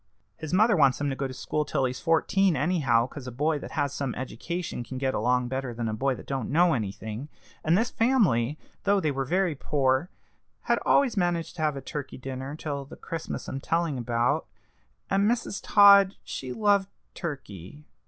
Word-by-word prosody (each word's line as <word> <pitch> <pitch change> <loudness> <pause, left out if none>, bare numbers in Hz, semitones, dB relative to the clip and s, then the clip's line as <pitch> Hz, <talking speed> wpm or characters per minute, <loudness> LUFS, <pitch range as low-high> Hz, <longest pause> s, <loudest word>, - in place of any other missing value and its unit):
His 155 -2 -7
mother 210 +4 +4
wants 140 -5 +4
him 145 -1 -1
to - - -3
go 135 0 -2
to - - -8
school 150 +3 -2
till 135 -2 0
he's 130 0 -3
fourteen 175 +2 +2
anyhow, 140 -6 +2
'cause 130 0 -9
a - - -5
boy 150 +5 0
that - - -9
has 140 -1 -1
some 135 -4 -3
education 130 +4 -4
can 130 +2 -7
get 130 0 0
along 125 +3 +1
better 130 -1 -4
than 115 -1 -2
a 110 - -2
boy 135 +4 0
that - - -11
don't 135 -4 -3
know 170 +3 +4
anything. 110 +4 -4 0.3
And 160 +3 +3
this 230 +4 0
family, 175 - +2 0.3
though 200 0 +3
they 155 -5 0
were 135 0 -2
very 180 +3 +1
poor, 135 +2 0 0.5
had - - +1
always 265 -6 +3
managed 175 -3 0
to - - -4
have 155 -2 +1
a - - -5
turkey 145 -1 -6
dinner 130 +2 -6
till 145 -3 -4
the 135 - -12
Christmas 165 -2 -6
I'm 135 - -4
telling 165 -2 -1
about, 120 +6 0 0.6
and 200 +2 +2
Mrs. 230 -4 -2
Todd 200 -2 +7
she 130 -1 -6
loved 200 - +2 0.2
turkey." 140 - -7
145 Hz, 195 wpm, -27 LUFS, 130-175 Hz, 0.6 s, Todd